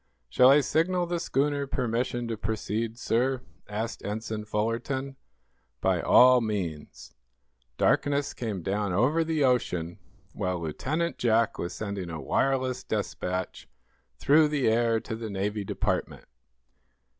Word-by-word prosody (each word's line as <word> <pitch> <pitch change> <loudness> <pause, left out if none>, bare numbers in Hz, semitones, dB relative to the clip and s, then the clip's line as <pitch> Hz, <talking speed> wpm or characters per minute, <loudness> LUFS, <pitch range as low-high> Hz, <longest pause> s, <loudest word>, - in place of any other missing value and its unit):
"Shall 125 - +6
I 145 +2 +7
signal 175 +5 +1
the 175 0 -2
schooner 145 -2 0
permission 120 -1 -1
to 115 - -1
proceed, 110 +1 -3
sir?" 125 +2 0 0.3
asked 110 +3 -4
Ensign 110 +1 -4
Fullerton. 115 +6 -2 0.6
"By - - +1
all 125 0 +6
means." 95 -9 -4 0.6
Darkness 145 -1 +1
came 105 -7 -4
down 100 0 -1
over 140 - +2
the 160 -2 0
ocean 90 -10 0 0.3
while 90 -1 -2
Lieutenant 150 - -2
Jack 115 -1 +2
was 85 - -3
sending 100 -4 -4
a 80 -1 -5
wireless 130 - 0
despatch 90 0 -3 0.5
through 150 - +5
the 145 -4 0
air 115 0 +2
to 110 - -5
the 110 -1 -6
Navy 100 +1 -2
Department. - - -2
115 Hz, 125 wpm, -27 LUFS, 105-135 Hz, 0.6 s, I